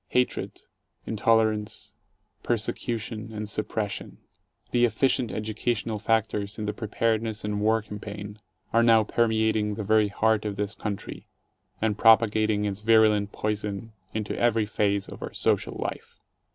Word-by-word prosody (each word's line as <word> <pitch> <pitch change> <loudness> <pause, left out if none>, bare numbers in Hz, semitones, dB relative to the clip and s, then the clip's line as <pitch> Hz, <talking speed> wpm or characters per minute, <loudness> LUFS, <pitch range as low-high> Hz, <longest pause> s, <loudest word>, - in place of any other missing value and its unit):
Hatred, 125 0 -1 0.4
intolerance, 110 -1 +1 0.5
persecution 115 0 -2
and 105 -1 -5
suppression 105 - -3 0.3
— - - -42
the 120 -1 +3
efficient 120 +1 +2
"educational" 110 0 -2
factors 105 -2 0
in 110 - -3
the 105 - -2
preparedness 110 0 -1
and 105 0 -2
war 110 +1 +2
campaign 105 0 -8 0.2
— - - -38
are 115 - +5
now 115 -1 +6
permeating 110 -2 +1
the 110 - -4
very 110 +1 +4
heart 110 +1 +1
of 105 -2 -3
this 105 +1 -2
country 105 -2 -6 0.5
and 110 -2 0
propagating 110 -2 +4
its 100 0 -3
virulent 105 -2 +4
poison 105 +1 -3 0.2
into 110 -1 -3
every 115 -2 +3
phase 100 -1 0
of - - -10
our - - -6
social - - 0
life. - - -6
110 Hz, 140 wpm, -26 LUFS, 105-110 Hz, 0.5 s, now